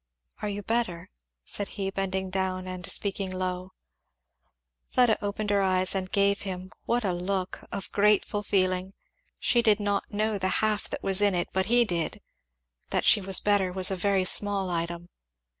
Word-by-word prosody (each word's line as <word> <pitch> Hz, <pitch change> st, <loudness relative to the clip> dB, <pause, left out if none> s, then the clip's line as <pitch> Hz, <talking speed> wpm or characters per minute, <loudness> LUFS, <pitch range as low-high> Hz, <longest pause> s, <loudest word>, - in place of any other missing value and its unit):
"Are 210 Hz, -, -2 dB
you 205 Hz, 0 st, -5 dB
better?" 220 Hz, -7 st, -2 dB, 0.3 s
said 205 Hz, -, -2 dB
he, 195 Hz, -1 st, -2 dB
bending 190 Hz, -1 st, -2 dB
down 185 Hz, -1 st, -2 dB
and 185 Hz, -1 st, -6 dB
speaking 195 Hz, -1 st, -1 dB
low. 185 Hz, 0 st, -4 dB, 1.1 s
Fleda 245 Hz, -4 st, +2 dB
opened 205 Hz, +1 st, -2 dB
her 200 Hz, -1 st, +3 dB
eyes 185 Hz, -1 st, +3 dB
and 185 Hz, -1 st, -3 dB
gave 200 Hz, 0 st, +2 dB
him, 185 Hz, -1 st, -6 dB
what 240 Hz, -1 st, 0 dB
a 185 Hz, -, +1 dB
look! 185 Hz, +1 st, -3 dB
of 195 Hz, -, -6 dB
grateful 205 Hz, 0 st, +2 dB
feeling. 185 Hz, -1 st, 0 dB, 0.4 s
She 240 Hz, -, +2 dB
did 220 Hz, -2 st, +3 dB
not 205 Hz, -1 st, -1 dB
know 215 Hz, 0 st, 0 dB
the 185 Hz, -, 0 dB, 0.2 s
half 215 Hz, -1 st, -1 dB
that -, -, -6 dB
was 195 Hz, +1 st, +1 dB
in 205 Hz, -2 st, +3 dB
it; 175 Hz, -, -1 dB
but 190 Hz, 0 st, 0 dB
he 240 Hz, +1 st, +4 dB
did. 170 Hz, -6 st, -2 dB, 0.7 s
That -, -, 0 dB
she 210 Hz, -, +6 dB
was 190 Hz, -1 st, +3 dB
better 200 Hz, -3 st, +2 dB
was 185 Hz, +1 st, +3 dB
a -, -, 0 dB
very 190 Hz, 0 st, +1 dB
small 195 Hz, -1 st, +3 dB
item. 170 Hz, +1 st, -4 dB
195 Hz, 175 wpm, -27 LUFS, 185-205 Hz, 1.1 s, she